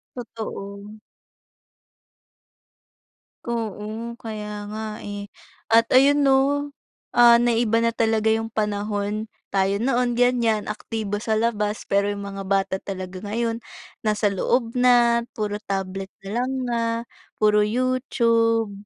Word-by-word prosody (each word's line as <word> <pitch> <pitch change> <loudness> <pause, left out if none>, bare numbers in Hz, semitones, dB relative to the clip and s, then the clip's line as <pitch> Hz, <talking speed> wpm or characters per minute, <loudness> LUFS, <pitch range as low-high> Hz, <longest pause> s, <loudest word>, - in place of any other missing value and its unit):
Totoo. 210 -3 -7 2.5
Oo, 225 0 -4
kaya 215 -2 -5 0.2
nga 215 +1 -5 0.2
eh 205 0 -6 0.5
at 230 0 +5
ayun 280 +3 +5
'no, 275 - +4 0.8
ah, 240 -1 +7
naiba 230 -1 +2
na 230 - +3
talaga 220 -1 +1
yung 225 0 0
panahon. 210 0 -2 0.2
Tayo 195 0 +2
noon 245 0 +1
ganyan 235 -3 +2
aktibo 210 -1 -4
sa 220 0 0
labas 210 -2 -1
pero 200 0 +2
yung 200 0 -5
mga 195 0 -6
bata 195 -1 +1
talaga 185 -2 -6
ngayon, 230 +2 -2 0.4
nasa 210 -1 +1
loob 230 +4 0
na, 240 -1 +4
puro 210 -1 -2
tablet 195 0 -4
na 195 - -7
lang 250 +2 0 0.2
nga, 235 -1 0 0.6
puro 210 -1 +4
YouTube, 230 -2 +1
220 Hz, 115 wpm, -23 LUFS, 205-235 Hz, 2.5 s, ah